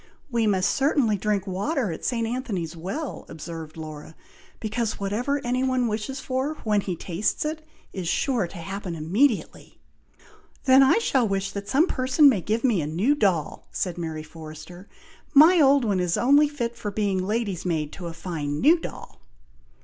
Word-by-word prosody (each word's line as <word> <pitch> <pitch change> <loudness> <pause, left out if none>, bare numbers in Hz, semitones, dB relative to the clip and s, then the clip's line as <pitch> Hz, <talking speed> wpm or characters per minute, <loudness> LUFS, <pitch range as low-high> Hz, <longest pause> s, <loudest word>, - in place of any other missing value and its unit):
"We 230 -2 +1
must 195 -2 +2
certainly 275 -6 +2
drink 205 -1 -1
water 205 - -1
at 160 - -7
St. 230 -2 0
Anthony's 220 - -3
Well," 195 - -5
observed 160 0 -8
Laura; 155 0 -8 0.4
"because 220 0 -2
whatever 235 +9 -1
any 250 +1 0
one 255 -2 +1
wishes 225 +5 -3
for 265 +4 -2
when 210 -2 +2
he 185 -2 -3
tastes 180 - -2
it, 310 +1 -3 0.3
is 185 -3 -4
sure 235 - 0
to 185 - -11
happen 185 +1 -5
immediately." 205 - 0 0.9
"Then 265 0 +6
I 270 +8 +5
shall 265 - +2
wish 195 0 -1
that 200 0 -6
some 295 +5 +4
person 265 -1 +3
may 215 -9 +1
give 220 +5 -1
me 230 -10 +2
a 145 - -3
new 185 - +2
doll," 190 - 0
said 180 -2 -3
Mary 160 -2 -4
Forrester. 160 +4 -11 0.5
"My 325 +5 +8
old 275 -2 +5
one 200 -4 +1
is 180 -1 0
only 285 +4 +5
fit 240 -5 -3
for 210 - -5
being 200 -2 -1
lady's 205 -3 -2
maid 155 -4 -2
to 180 -3 -7
a 165 - -6
fine 155 -4 -4
new 325 +5 +5
doll." 65 - -9
205 Hz, 170 wpm, -25 LUFS, 175-260 Hz, 0.9 s, My